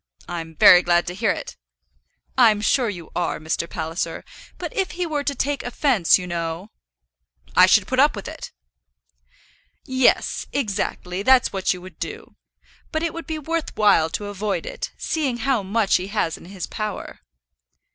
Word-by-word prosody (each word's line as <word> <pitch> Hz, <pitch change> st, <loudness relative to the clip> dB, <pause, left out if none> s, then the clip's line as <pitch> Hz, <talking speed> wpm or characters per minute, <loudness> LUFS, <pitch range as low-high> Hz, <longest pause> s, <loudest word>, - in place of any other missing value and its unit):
"I'm 165 Hz, -2 st, -6 dB
very 180 Hz, +3 st, +8 dB
glad 175 Hz, -1 st, +2 dB
to 175 Hz, -, -4 dB
hear 185 Hz, -, 0 dB
it." -, -, -3 dB, 0.8 s
"I'm 225 Hz, -5 st, +5 dB
sure 235 Hz, +3 st, +2 dB
you 175 Hz, -5 st, -8 dB
are, 175 Hz, -, -1 dB
Mr. 160 Hz, +2 st, -2 dB
Palliser. 165 Hz, 0 st, -4 dB, 0.3 s
But -, -, -6 dB
if 385 Hz, -4 st, -1 dB
he 355 Hz, 0 st, -2 dB
were 300 Hz, -3 st, -2 dB
to 280 Hz, 0 st, -1 dB
take 285 Hz, +3 st, -1 dB
offence, 245 Hz, -, +3 dB
you 185 Hz, -, -6 dB
know?" 170 Hz, +2 st, -4 dB, 0.8 s
"I -, -, +8 dB
should -, -, +5 dB
put -, -, -1 dB
up -, -, +5 dB
with -, -, -7 dB
it." -, -, -8 dB, 1.3 s
"Yes, 260 Hz, -1 st, +2 dB
exactly; 195 Hz, -6 st, -2 dB
that's 260 Hz, +2 st, +4 dB
what 190 Hz, -1 st, 0 dB
you 180 Hz, -1 st, -5 dB
would 185 Hz, -3 st, -13 dB
do. 440 Hz, +2 st, -7 dB, 0.6 s
But 315 Hz, 0 st, -1 dB
it 335 Hz, -, -1 dB
would 335 Hz, 0 st, -7 dB
be 315 Hz, -, -3 dB
worth 325 Hz, +2 st, -3 dB
while 200 Hz, -7 st, +4 dB
to 205 Hz, -, -4 dB
avoid 205 Hz, 0 st, -3 dB
it, -, -, -5 dB
seeing 280 Hz, -7 st, -1 dB
how 260 Hz, -2 st, +1 dB
much 200 Hz, +1 st, +2 dB
he 185 Hz, -, -5 dB
has 200 Hz, -6 st, -1 dB
in -, -, -13 dB
his 185 Hz, -1 st, -6 dB
power." 215 Hz, -1 st, -5 dB
210 Hz, 170 wpm, -22 LUFS, 180-275 Hz, 1.3 s, very